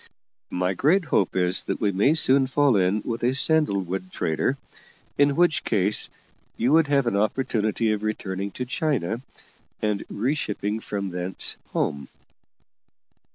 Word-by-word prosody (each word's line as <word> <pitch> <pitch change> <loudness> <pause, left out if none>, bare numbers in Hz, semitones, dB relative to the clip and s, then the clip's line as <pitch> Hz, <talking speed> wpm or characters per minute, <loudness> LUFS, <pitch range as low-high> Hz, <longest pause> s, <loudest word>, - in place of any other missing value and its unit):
My 90 +1 -1
great 165 - +2
hope 100 - +1
is 90 0 +1
that - - -3
we 105 -2 +1
may 105 - +3
soon 135 -4 +5
fall 140 -1 +3
in 95 +2 +1
with 115 -1 -3
a 125 +2 +1
sandalwood 100 - 0
trader, 80 - -1 0.6
in 145 -1 +3
which 175 -2 +2
case 105 -1 +1 0.5
you 125 +4 +1
would 160 0 +5
have 140 -2 +2
an 115 - 0
opportunity 110 0 0
of 105 -1 -1
returning 100 -2 -3
to 125 - -4
China, 125 - -1 0.6
and 105 -2 -1
re 125 +7 -1
shipping 105 -6 -3
from 100 -3 -4
thence 90 +1 -1
home." 70 -2 -2
110 Hz, 145 wpm, -24 LUFS, 95-135 Hz, 0.6 s, soon